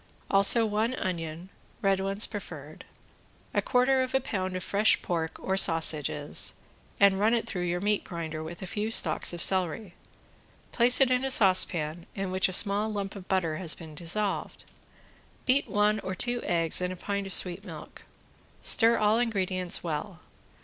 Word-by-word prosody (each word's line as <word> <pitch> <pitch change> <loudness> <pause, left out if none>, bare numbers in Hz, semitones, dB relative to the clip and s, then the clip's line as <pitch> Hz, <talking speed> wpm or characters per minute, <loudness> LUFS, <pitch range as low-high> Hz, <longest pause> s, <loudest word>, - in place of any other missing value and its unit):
Also 200 +4 +5
one 220 +4 -1
onion 170 -2 -5 0.3
(red 195 -1 +2
ones 195 +2 0
preferred), 160 -8 -9 0.7
a - - +1
quarter 260 +1 +2
of 255 0 -2
a - - +4
pound 185 -7 -4
of 185 - -4
fresh 205 +2 +3
pork, 165 -2 -3
or 190 - -2
sausages, 155 -5 +2 0.4
and 200 -1 +4
run 220 +3 +3
it 230 - -1
through 180 - -5
your 175 0 -2
meat 205 +2 0
grinder 160 -2 -6
with 170 +3 -9
a - - -4
few 210 +3 -3
stalks 225 - +2
of 175 -1 -2
celery; 185 +1 +1 0.8
place 250 +2 +3
it 260 -1 +4
in 250 +1 +1
a 270 - -1
saucepan, 175 -7 +3
in 195 -1 -4
which 185 +1 +1
a - - -5
small 205 +3 +1
lump 200 -1 -5
of 190 -2 -10
butter 170 -5 -1
has 170 -2 -1
been 160 -2 -11
dissolved. 180 +5 -3 0.8
Beat 265 +2 +2
one 210 +1 +1
or 190 -2 -5
two 240 +3 -1
eggs 165 0 0
in 180 0 -2
a - - -6
pint 200 +2 -4
of 190 - -2
sweet 180 +1 +1
milk. 165 -6 -11 0.6
Stir 230 0 +4
all 215 +2 +2
ingredients 185 -6 -1
well. 165 +2 -5
190 Hz, 170 wpm, -27 LUFS, 175-215 Hz, 0.8 s, Also